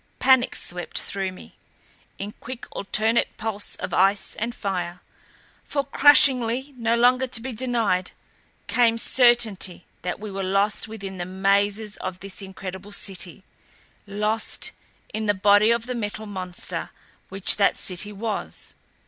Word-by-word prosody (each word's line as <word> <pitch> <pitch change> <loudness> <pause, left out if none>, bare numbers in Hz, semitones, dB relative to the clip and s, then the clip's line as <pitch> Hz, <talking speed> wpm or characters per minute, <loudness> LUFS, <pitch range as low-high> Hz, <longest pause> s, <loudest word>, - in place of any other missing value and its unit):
Panic 260 -1 +4
swept 175 0 -4
through 195 -1 -2
me, 185 - -14 0.6
in 200 +1 -5
quick, 255 0 -7
alternate 220 +3 +1
pulse 215 -2 -3
of - - -5
ice 195 +1 +2
and 235 +2 -2
fire. 180 -3 -3 0.6
For 280 - -1
crushingly, 270 -2 +4
no 230 -1 +1
longer 250 +2 +4
to 245 - -1
be 260 +3 -5
denied, 230 -6 0 0.6
came 230 -2 +3
certainty 230 -7 +3 0.2
that 180 +1 -3
we 210 0 -6
were 195 0 -3
lost 195 +3 +1
within 195 -4 -7
the 175 - -2
mazes 200 +3 +1
of 185 0 -5
this 195 +2 -8
incredible 190 +1 -8
City 190 -2 -3 0.6
lost 210 +2 -1 0.4
in 215 0 -2
the 205 - +3
body 205 +2 +5
of 235 0 +2
the 250 - -3
Metal 215 -2 -4
Monster 185 -3 -5 0.4
which 195 0 +4
that 200 - +3
City 190 +3 -4
was. 210 +1 -4
205 Hz, 140 wpm, -24 LUFS, 195-235 Hz, 0.6 s, body